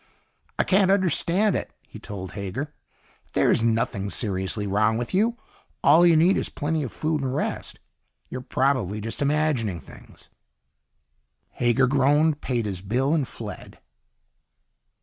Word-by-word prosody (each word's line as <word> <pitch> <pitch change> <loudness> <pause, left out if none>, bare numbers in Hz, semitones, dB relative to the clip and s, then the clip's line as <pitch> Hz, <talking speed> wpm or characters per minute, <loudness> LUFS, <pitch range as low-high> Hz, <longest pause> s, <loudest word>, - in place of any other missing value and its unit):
"I - - +3
can't 190 0 +3
understand 190 +1 +2
it," - - -3 0.2
he - - -11
told 95 -3 -7
Hager. 105 +11 -5 0.6
"There's - - +3
nothing 110 -3 0
seriously 100 -1 -2
wrong 105 +3 +2
with 120 0 -4
you. 225 +5 +2 0.5
All 165 +5 +6
you 170 - +5
need 175 +5 +4
is - - -1
plenty 155 +2 -2
of 130 - -4
food 155 -1 -1
and 130 -1 -2
rest. - - -3 0.5
You're 130 - -6
probably 125 -6 0
just 115 +5 -5
imagining 140 - 0
things." 70 - -15 1.2
Hager 120 +2 +2
groaned, 145 +3 +2
paid 120 -4 -1
his 95 -3 -4
bill, 125 +9 0
and 150 -6 +1
fled. 115 -3 -9
130 Hz, 135 wpm, -24 LUFS, 105-155 Hz, 1.2 s, All